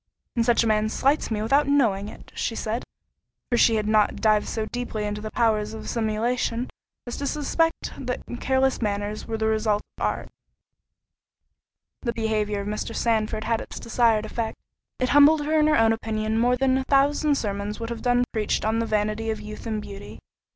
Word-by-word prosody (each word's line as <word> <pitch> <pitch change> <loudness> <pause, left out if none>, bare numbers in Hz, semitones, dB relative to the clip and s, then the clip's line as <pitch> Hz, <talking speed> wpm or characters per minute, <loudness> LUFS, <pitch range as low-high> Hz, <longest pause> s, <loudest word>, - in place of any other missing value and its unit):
"And 235 - +2
such 235 0 +3
a - - 0
man 215 0 +2
slights 275 +6 +1
me 215 -2 -1
without 275 +6 +3
knowing 220 -8 +2
it," - - -13
she 225 - -2
said—for 230 +2 -6
she 225 - +5
had 215 -1 0
not 215 -1 +3
dived 215 -1 +2
so 220 -1 -2
deeply 235 -2 -4
into 210 0 -3
the 215 - -5
powers 215 -2 +1
of 220 - -8
simulation, 230 +2 -1 0.3
as 240 - -5
to 280 - -2
suspect 320 +3 0
that 250 - -3
such 240 - -6
careless 265 -1 +1
manners 205 0 -2
were 225 -1 -2
the 220 - -1
result 215 -1 +1 0.2
of - - -3
art. - - -1 1.7
This 235 -3 -2
behaviour 215 -2 -1
of 200 - -6
Mr. 215 +2 -4
Sandford 220 -1 0
had 230 0 0
its - - -8
desired 225 -2 +2
effect—it 230 +3 -5
humbled 290 +1 +6
her 310 +1 +2
in 305 - +4
her 305 - +4
own 225 0 +4
opinion 220 0 -1
more 245 +2 +3
than 265 0 +2
a - - -2
thousand 285 +2 +3
sermons 205 -3 -3
would 230 0 -4
have 235 - -5
done 245 -1 +3
preached 215 -1 0
on 220 +1 +1
the 230 - -1
vanity 215 +1 0
of 220 -1 -2
youth 215 +2 -8
and 215 -1 -2
beauty. 200 0 -9
225 Hz, 190 wpm, -25 LUFS, 215-245 Hz, 1.7 s, humbled